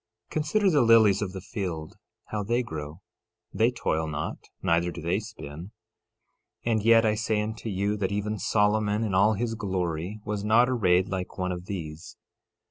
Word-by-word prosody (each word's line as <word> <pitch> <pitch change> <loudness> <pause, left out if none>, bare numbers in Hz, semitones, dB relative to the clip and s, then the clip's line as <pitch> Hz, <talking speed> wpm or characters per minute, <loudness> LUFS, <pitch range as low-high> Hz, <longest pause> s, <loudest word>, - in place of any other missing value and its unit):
Consider 185 +6 +2
the 150 - +4
lilies 110 -4 +5
of 100 -3 -2
the 95 0 -7
field 90 -5 -5 0.3
how 105 - -2
they 120 +5 0
grow; 80 -4 -7 0.5
they 115 +2 +3
toil 80 -10 -1
not, 75 -1 -3 0.3
neither 85 +1 +2
do 85 - -8
they 85 +4 0
spin; 85 -8 -9 1.0
13:29 120 - +1
And 110 -1 +2
yet 115 0 +6
I 110 - +3
say 110 0 0
unto 110 +2 -4
you, 100 +1 0
that 100 -2 -1
even 105 +1 -2
Solomon, 105 +2 +2
in 105 -4 -2
all 100 +4 +4
his 115 +2 -2
glory, 95 -2 -3
was 105 -1 -3
not 115 +4 +5
arrayed 95 -7 +3
like 95 -1 -4
one 90 -1 -1
of 90 0 -6
these. 80 -5 -7
105 Hz, 175 wpm, -27 LUFS, 90-110 Hz, 1.0 s, yet